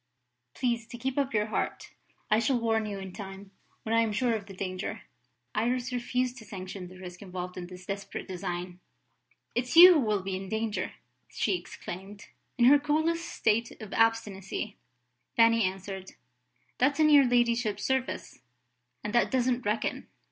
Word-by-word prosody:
Please 235 -3 -1
to 240 - -8
keep 260 +2 -2
up 275 -1 0
your 210 -1 +1
heart; 220 - -3 0.4
I 215 - +5
shall 245 +3 +2
warn 225 -1 +1
you 205 -1 -4
in 190 -1 -7
time, 195 -1 -9 0.3
when 225 - -2
I 230 - +5
am 225 -1 +1
sure 235 +3 +1
of 210 -3 -3
the 195 - -9
danger." 185 -1 -4 0.5
Iris 245 +3 0
refused 250 +1 -1
to - - -11
sanction 190 -2 -7
the 185 +1 -13
risk 180 -1 -9
involved 180 -2 -6
in 175 -1 -6
this 180 0 -11
desperate 200 0 -5
design. 180 -1 -5 0.7
"It's 250 +5 -1
you 360 +2 +12
who 320 - +4
will 210 -6 0
be 190 0 -2
in 190 0 -6
danger!" 220 0 -2 0.4
she - - 0
exclaimed. 200 - -8 0.3
In 240 - +5
her 285 +3 +8
coolest 315 +3 0
state 230 +2 0
of 215 -3 -8
obstinacy, 210 -2 0 0.6
Fanny 230 0 +5
answered: 190 0 -4 0.7
"That's 285 +4 +3
in 305 -1 +5
your 280 -3 +7
ladyship's 235 -3 +1
service 265 -1 -2 0.6
and 210 - -4
that 240 - +4
doesn't 250 -2 +1
reckon." 215 +2 -1
220 Hz, 165 wpm, -29 LUFS, 195-245 Hz, 0.7 s, you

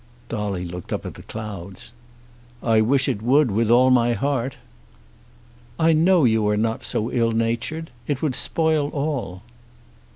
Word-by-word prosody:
Dolly 100 -5 -3
looked 90 0 -8
up - - -3
at - - -6
the - - -12
clouds. 100 -1 -8 0.7
"I 110 -2 +3
wish 130 +4 +2
it 100 - -1
would 130 +2 +3
with 110 +2 +1
all 125 +2 +5
my 120 -1 +3
heart." 135 0 -2 1.2
"I 165 0 +3
know 170 +2 +4
you 110 -2 +2
are 105 0 +1
not 110 +1 -1
so 110 +3 -1
ill 115 -1 +1
natured. 120 +8 -2 0.2
It 145 -3 -1
would 150 -4 +1
spoil 155 +1 +1
all." 140 -11 -3
120 Hz, 155 wpm, -22 LUFS, 110-140 Hz, 1.2 s, all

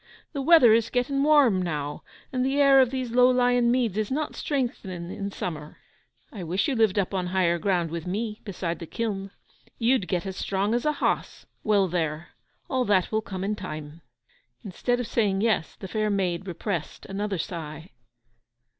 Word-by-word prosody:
The 280 - -2
weather 270 -6 +7
is 230 0 +2
getting 260 +2 0
warm 280 -10 +5
now, 150 -4 -3 0.3
and 255 -1 +1
the 270 +2 +1
air 275 -1 +7
of 255 - +3
these 255 -2 -3
low 250 +1 +5
lying 245 -1 +3
meads 235 -5 +1
is 215 - -1
not 300 +3 -2
strengthening 190 - -3
in 200 0 -4
summer. 155 -5 -6 0.6
I 195 - -6
wish 180 +4 0
you 280 - 0
lived 220 -4 +2
up 195 -1 0
on 185 -2 -1
higher 175 -2 +1
ground 175 -4 0
with 170 0 -5
me, 210 +3 -3
beside 175 -5 -4
the 165 - -7
kiln. 200 -3 -3 0.5
You'd 235 -4 +2
get 180 -1 -1
as 190 -1 -4
strong 195 +3 -1
as 240 +3 0
a 300 - +2
hoss! - - -2 0.2
Well, 205 -3 +3
there; 165 -2 -2 0.4
all 260 -1 0
that 195 -4 +2
will 220 0 +1
come 190 -3 -6
in 210 +2 -1
time.' 155 -4 -7 0.6
Instead 245 +6 -1
of 245 - -2
saying 205 -3 +1
yes, 220 -7 0
the 190 - -8
fair 215 +2 -1
maid 190 -2 -1
repressed 175 -2 -4
another 200 0 -3
sigh. 160 0 -6
200 Hz, 180 wpm, -26 LUFS, 180-245 Hz, 0.6 s, weather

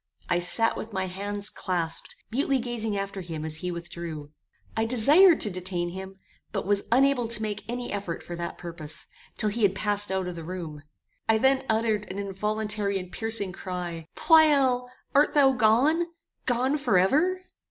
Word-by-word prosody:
I 175 -1 +2
sat 225 +6 +2
with 220 - -7
my 190 -1 -1
hands 200 +2 -3
clasped, 170 -3 -3 0.2
mutely 270 +3 +1
gazing 230 -4 -2
after 195 0 -4
him 160 -3 -5
as 155 -1 -3
he 180 +3 -4
withdrew. 170 -3 -6 0.4
I 220 - +1
desired 290 - +6
to 210 - +2
detain 180 -1 -3
him, 190 +2 -8 0.3
but - - -3
was 200 0 +2
unable 260 -1 +3
to 225 -1 +2
make 210 -2 -3
any 245 0 -4
effort 195 -4 -4
for 175 - -6
that 170 0 -5
purpose, 165 -3 -6 0.3
till 215 - +4
he 225 +3 -3
had 195 -2 +3
passed 205 0 0
out 190 -1 0
of 180 - -5
the 165 - -7
room. 165 -4 -6 0.5
I 220 - +5
then 265 +3 +2
uttered 220 -2 +1
an 190 - -6
involuntary 210 +1 -1
and 180 -1 -7
piercing 225 -4 -1
cry 175 -3 -5
"Pleyel! 275 -6 +4 0.2
Art 290 +2 +4
thou 275 -2 +6
gone? 260 +8 +3 0.4
Gone 255 +4 +1
forever?" 275 - +3
205 Hz, 170 wpm, -27 LUFS, 180-245 Hz, 0.5 s, desired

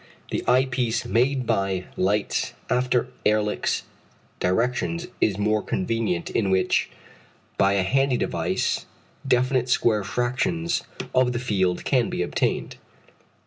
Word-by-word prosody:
The - - -1
eye 130 +2 +5
piece 125 -2 -1
made 125 +2 +1
by 95 -5 0
Leitz 100 +3 0 0.2
after 125 0 +1
Ehrlich's 105 0 +1 0.6
directions 125 - 0 0.2
is 100 -3 +2
more 105 +1 +1
convenient, 100 -4 -1
in 100 -4 +1
which, 95 -1 +2 0.7
by 100 0 +3
a 100 -1 +2
handy 135 +5 +2
device, - - -1 0.4
definite 130 0 +2
square 110 -4 +2
fractions 130 - -1 0.3
of 130 -1 +3
the - - -1
field 95 -7 0
can - - +2
be - - -1
obtained. - - -1
115 Hz, 120 wpm, -24 LUFS, 100-125 Hz, 0.7 s, eye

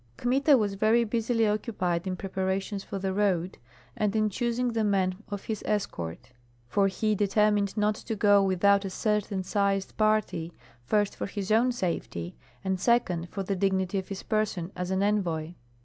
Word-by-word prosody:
Kmita 270 +3 +4
was 205 -4 0
very 220 +4 +3
busily 230 0 +1
occupied 195 -5 -1
in 185 - -1
preparations 190 +1 -2
for 195 - -5
the 190 0 -2
road, 190 -3 0 0.4
and 210 0 0
in 215 -1 +2
choosing 240 +2 -1
the 225 -1 +1
men 195 -3 +2 0.2
of 205 -1 -5
his 220 -2 -4
escort; 105 - -3 0.4
for 195 +9 +2
he 215 +2 0
determined 205 0 +2
not 210 0 +2
to 220 +1 -5
go 205 -1 +5
without 195 +1 +3
a 195 - -3
certain 205 -1 -1
sized 195 0 0
party, 215 -6 +1 0.3
first 205 -1 +1
for - - -4
his 200 0 -4
own 235 +4 +4
safety, 115 - -3 0.3
and 190 -1 -1
second 180 -7 +1
for 195 +3 -4
the 195 +1 -1
dignity 190 0 0
of 190 - -7
his 195 -1 -6
person 205 -5 -1
as 180 0 -3
an 190 +1 +1
envoy. 175 -6 0
200 Hz, 170 wpm, -28 LUFS, 190-215 Hz, 0.4 s, go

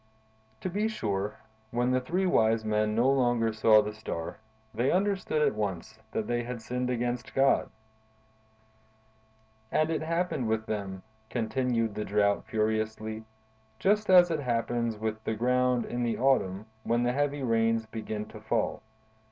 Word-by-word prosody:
"To - - -2
be 205 +4 0
sure, 105 - -2 0.3
when 120 +2 0
the 130 0 +2
three 180 +9 0
wise 110 -9 +3
men 105 0 +1
no 120 +3 +3
longer 120 -4 +2
saw 110 -1 +5
the 105 0 -4
Star, 85 -5 -5 0.3
they 120 +4 +1
understood 190 -5 +1
at - - +3
once 100 -5 -4
that 110 - -2
they 120 +2 0
had 120 0 -5
sinned 125 +2 -3
against 120 -1 -2
God. 135 0 +3 2.0
"And 155 +1 +2
it 160 -2 -1
happened 165 -5 -1
with 110 0 0
them," 100 -3 -4 0.3
continued 115 -1 0
the 105 - -3
Drought 100 -1 +1
furiously, 110 0 -1 0.5
"just 210 - +2
as 180 -2 +7
it 160 - 0
happens 115 -3 -1
with 110 0 -3
the 110 - -1
ground 125 +1 +2
in 120 - -3
the 120 -1 0
autumn, 110 -7 +1 0.2
when 120 +2 +1
the 120 0 +1
heavy 145 0 0
rains 115 -1 +2
begin 110 -1 -5
to - - -11
fall. - - -1
115 Hz, 150 wpm, -29 LUFS, 110-130 Hz, 2.0 s, as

